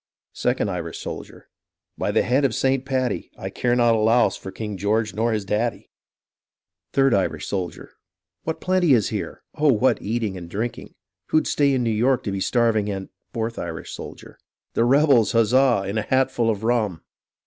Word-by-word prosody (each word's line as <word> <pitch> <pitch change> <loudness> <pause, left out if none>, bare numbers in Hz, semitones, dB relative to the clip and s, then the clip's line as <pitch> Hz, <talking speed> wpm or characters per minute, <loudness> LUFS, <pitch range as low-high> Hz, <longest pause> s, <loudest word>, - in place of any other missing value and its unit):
Second 125 -3 0
Irish 85 -4 -4
Soldier - - -8 0.5
By - - -2
the - - +2
head 130 +4 +2
of 130 -5 +1
St. 135 0 +1
Paddy 130 -2 -1
I - - -6
care 120 -1 0
not 120 -1 +4
a 110 - +2
louse 115 +3 +3
for - - -8
King 105 +1 -5
George 105 +3 0
nor 115 +3 0
his 105 -2 -1
daddy. 110 +4 -2 1.0
Third 135 -2 +3
Irish 95 -2 0
Soldier 90 -3 -4 0.5
What 160 - -3
plenty 180 -5 +3
is 110 -4 +1
here! - - -5
Oh, 150 -1 +3
what 125 +2 +2
eating 110 -3 -2
and 85 -2 -9
drinking! 115 +5 -5 0.3
Who'd 155 - +2
stay 145 -1 +2
in 125 - 0
New 115 - +1
York 120 +4 +2
to 100 - -3
be 100 - -2
starving 110 -1 +1
and 95 -1 -5
— - - -54
Fourth 115 -1 -3
Irish 80 -1 -6
Soldier - - -10 0.3
The 115 - +2
rebels, 135 -3 +4
huzza! 120 -1 +4
in 100 +3 -1
a - - 0
hat 130 +4 +1
full 115 -1 +1
of 105 -1 -2
rum. 110 -8 0
115 Hz, 185 wpm, -23 LUFS, 105-130 Hz, 1.0 s, not